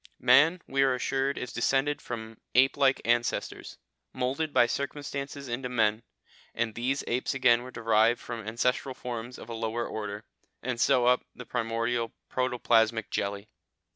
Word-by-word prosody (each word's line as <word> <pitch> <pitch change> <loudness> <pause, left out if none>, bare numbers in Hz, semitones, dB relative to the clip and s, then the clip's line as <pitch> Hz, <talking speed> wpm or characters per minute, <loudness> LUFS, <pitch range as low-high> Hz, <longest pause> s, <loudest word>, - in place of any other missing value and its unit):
Man, 160 +8 +5
we 135 0 +1
are 135 -1 +4
assured, 135 +2 -1
is 125 - -5
descended 135 +4 +1
from 110 -2 -7 0.2
ape 130 +2 +5
like 135 -1 +2
ancestors, 120 0 -1 0.4
moulded 135 +5 -1
by 120 - +5
circumstances 140 +1 -4
into 125 +1 -3
men, 110 -2 +2 0.5
and 115 -1 -1
these 130 +5 -1
apes 125 +3 -1
again 125 -3 +4
were 125 - -8
derived 115 0 +2
from 120 -1 -6
ancestral 125 +3 0
forms 120 0 -6
of - - -10
a 120 - -6
lower 115 +1 -2
order, 105 -1 -5 0.4
and 120 -1 -2
so 130 -3 +4
up 125 0 +5
from - - -35
the 125 - -9
primordial 115 0 -1 0.2
protoplasmic 115 -3 +1
jelly. 100 +1 -2
120 Hz, 155 wpm, -28 LUFS, 115-130 Hz, 0.5 s, Man